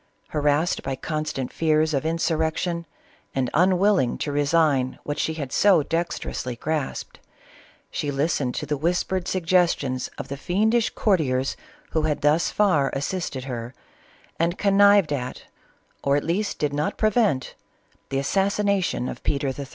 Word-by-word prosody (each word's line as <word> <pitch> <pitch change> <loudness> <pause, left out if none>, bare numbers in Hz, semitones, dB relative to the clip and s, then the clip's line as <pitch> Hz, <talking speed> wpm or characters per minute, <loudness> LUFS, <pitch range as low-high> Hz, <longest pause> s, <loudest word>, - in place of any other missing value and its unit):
Harassed 150 +2 +1
by 135 0 -3
constant 155 -3 -3
fears 155 -1 +2
of 140 +2 0
insurrection 165 +1 -1 0.5
and 130 -2 0
unwilling 185 -4 +3
to 145 - -3
resign 145 -3 +2
what 145 +1 -4
she 160 - -1
had 140 -5 -5
so 190 -7 +4
dexterously 165 -6 -3
grasped, 155 +3 -3 0.7
she 145 - -2
listened 140 -2 0
to - - -3
the 150 0 -1
whispered 180 +3 -1
suggestions 165 -8 +1
of - - -6
the 140 - -5
fiendish 215 +9 +1
courtiers 135 - +1 0.4
who 160 - +1
had 155 -1 -1
thus 150 +4 +3
far 160 -10 +2
assisted 140 -2 -3
her 125 -1 -6 0.6
and 170 +2 +1
connived 200 -4 +5
at, 130 -2 -4 0.6
or 140 0 +3
at 145 - 0
least 200 +5 -1
did 150 -1 -1
not 145 +1 -1
prevent, 215 - +1 0.6
the 135 - -1
assas 195 +9 +1
sination 200 -10 +1
of - - -6
Peter 140 -1 0
III. 135 +1 -5
155 Hz, 145 wpm, -24 LUFS, 140-180 Hz, 0.7 s, connived